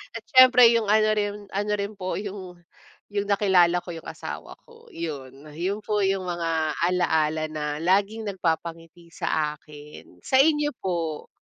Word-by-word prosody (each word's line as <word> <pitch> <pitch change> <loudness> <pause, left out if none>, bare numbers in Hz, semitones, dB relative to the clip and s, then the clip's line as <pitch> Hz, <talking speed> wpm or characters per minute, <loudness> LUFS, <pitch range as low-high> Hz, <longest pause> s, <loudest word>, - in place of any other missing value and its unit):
At - - -6
siyempre 250 -2 +8
yung 225 -3 0
ano 215 0 +4
rin, 205 -1 -1 0.2
ano 205 +2 -2
rin 200 +1 -3
po 185 -1 -4
yung 190 -3 -8 0.5
yung 205 0 -2
nakilala 190 -4 +4
ko 175 - -6
yung 165 - -10
asawa - - -8
ko 465 0 -19
yun. 140 -4 -7
Yun 185 +6 -2
po 210 -1 0
yung 195 -1 0
mga 165 -3 -1 0.2
ala-ala 160 -3 +1
na 150 -1 -4
laging 200 +6 +1
nagpapangiti 170 -2 -4
sa 150 -1 -1
akin. 150 0 -14
Sa 265 0 +5
inyo 295 -1 +2
po? 165 -4 -3
180 Hz, 150 wpm, -25 LUFS, 160-205 Hz, 0.5 s, siyempre